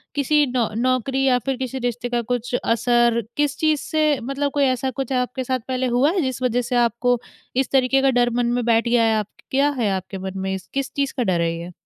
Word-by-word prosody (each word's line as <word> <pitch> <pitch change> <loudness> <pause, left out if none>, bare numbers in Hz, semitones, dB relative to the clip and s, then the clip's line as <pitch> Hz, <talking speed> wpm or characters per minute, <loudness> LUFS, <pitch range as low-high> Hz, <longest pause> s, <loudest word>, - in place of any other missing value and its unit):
किसी 295 +1 +3
नौक 245 -4 0
नौकरी 255 +2 0
या 250 -2 +3
फिर 270 -1 -1
किसी 260 0 -4
रिश्ते 245 0 -3
का 240 -1 0
कुछ 245 +1 -3
असर 235 0 +2 0.2
किस 295 0 0
चीज़ 310 -2 +2
से 305 -2 +1
मतलब 275 +3 -2
कोई 285 0 +1
ऐसा 260 0 0
कुछ 270 - -5
आपके 250 +1 -1
साथ 255 +1 -1
पहले 255 0 -1
हुआ 285 +5 +4
है 375 - 0
जिस 260 -3 -3
वज़ह 245 0 +1
से 245 +1 -3
आपको 240 +1 +2 0.4
इस 265 -1 0
तरीके 270 0 +3
का 270 - +3
डर 240 0 +3
मन 240 +1 0
में - - -2
बैठ 230 0 +2
गया 235 -1 +3
है 225 - +2
आपक 210 - -4
आप - - -23
क्या 275 +2 +3
है 215 - +1
आपके 190 +1 -6
मन 190 0 -5
में? 190 0 -2 0.2
किस 275 -1 -2
चीज़ 280 -1 -1
का 250 - +1
डर 175 -5 +1
है 165 - +1
ये? 170 +1 -7
250 Hz, 245 wpm, -22 LUFS, 235-270 Hz, 0.4 s, हुआ